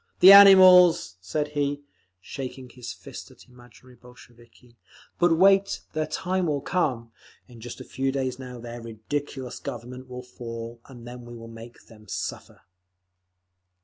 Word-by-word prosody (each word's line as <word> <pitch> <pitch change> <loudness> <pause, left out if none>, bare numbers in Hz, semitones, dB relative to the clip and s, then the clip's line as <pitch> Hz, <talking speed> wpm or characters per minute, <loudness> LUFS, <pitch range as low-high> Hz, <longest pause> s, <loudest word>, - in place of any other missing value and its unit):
"The 190 - +9
animals!" 185 - +7
said 150 +11 -3
he, 145 -1 -3 0.4
shaking 130 +5 -8
his 120 -1 -9
first - - -11
at - - -19
imaginary 125 0 -19
Bolsheviki. 120 0 -20 0.4
"But 175 -2 +3
wait! 195 +2 +3
Their 155 -1 -2
time 185 -1 -2
will 145 -2 -1
come; 125 -10 -2 0.4
in 120 -3 -15
just 120 +1 -9
a - - -8
few 135 +1 -3
days 130 -2 -3
now 125 -1 -9
their 120 0 -9
ridiculous 125 +3 -6
Government 125 -1 -9
will 125 0 -8
fall, 115 -1 -9
and 120 -3 -13
then 125 0 -9
we 120 0 -11
shall 115 0 -11
make 115 +1 -13
them 110 -2 -18
suffer!" - - -7
125 Hz, 145 wpm, -25 LUFS, 120-145 Hz, 0.4 s, The